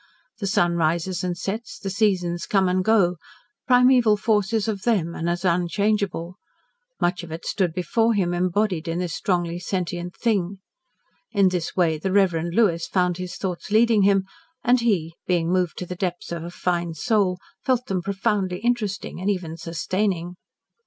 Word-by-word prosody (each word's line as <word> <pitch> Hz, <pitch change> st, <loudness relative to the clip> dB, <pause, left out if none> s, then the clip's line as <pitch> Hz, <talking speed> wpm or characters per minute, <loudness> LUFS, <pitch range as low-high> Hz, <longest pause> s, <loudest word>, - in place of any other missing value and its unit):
The 200 Hz, -, -2 dB
sun 175 Hz, -2 st, +2 dB
rises 170 Hz, +3 st, 0 dB
and 180 Hz, -1 st, -2 dB
sets, 210 Hz, +6 st, -4 dB
the 195 Hz, -, -5 dB
seasons 180 Hz, -4 st, 0 dB
come 195 Hz, -2 st, +3 dB
and 185 Hz, +1 st, +1 dB
go, 185 Hz, -5 st, +3 dB, 0.5 s
Primeval 250 Hz, -4 st, +5 dB
Force 210 Hz, -1 st, +1 dB
is 225 Hz, -1 st, 0 dB
of 205 Hz, -3 st, -2 dB
them, 185 Hz, -8 st, +1 dB
and 170 Hz, 0 st, -2 dB
as 175 Hz, +1 st, -2 dB
unchangeable. 180 Hz, 0 st, 0 dB, 0.6 s
Much 175 Hz, +1 st, 0 dB
of 170 Hz, -2 st, -10 dB
it 165 Hz, +1 st, -7 dB
stood 185 Hz, -4 st, 0 dB
before 225 Hz, +6 st, +1 dB
him 180 Hz, -3 st, +1 dB
embodied 180 Hz, -1 st, 0 dB
in 165 Hz, +1 st, -2 dB
this 175 Hz, -3 st, -2 dB
strongly 175 Hz, -1 st, -1 dB
sentient 175 Hz, -1 st, -3 dB
thing. 200 Hz, -5 st, 0 dB, 0.8 s
In 200 Hz, -3 st, +4 dB
this 180 Hz, -2 st, -3 dB
way 165 Hz, -4 st, +2 dB
the 190 Hz, +4 st, -2 dB
Reverend 175 Hz, -4 st, +2 dB
Lewis 175 Hz, -8 st, +2 dB
found 180 Hz, -2 st, +1 dB
his 180 Hz, -1 st, -5 dB
thoughts 185 Hz, -1 st, -4 dB
leading 220 Hz, 0 st, +4 dB
him, 195 Hz, -1 st, +3 dB, 0.4 s
and 250 Hz, 0 st, +4 dB
he 190 Hz, -9 st, 0 dB
being 175 Hz, -2 st, +1 dB
moved 180 Hz, -3 st, 0 dB
to 180 Hz, -, -4 dB
the 180 Hz, -, -5 dB
depths 180 Hz, -1 st, -3 dB
of 170 Hz, -1 st, -4 dB
a 170 Hz, -, -5 dB
fine 175 Hz, -2 st, -2 dB
soul 195 Hz, 0 st, +1 dB, 0.3 s
felt 255 Hz, -2 st, +1 dB
them 190 Hz, -5 st, -1 dB
profoundly 195 Hz, -1 st, -1 dB
interesting, 215 Hz, -4 st, -2 dB
and 195 Hz, -, 0 dB
even 180 Hz, -5 st, -2 dB
sustaining. 175 Hz, +2 st, -2 dB
185 Hz, 170 wpm, -23 LUFS, 175-205 Hz, 0.8 s, Primeval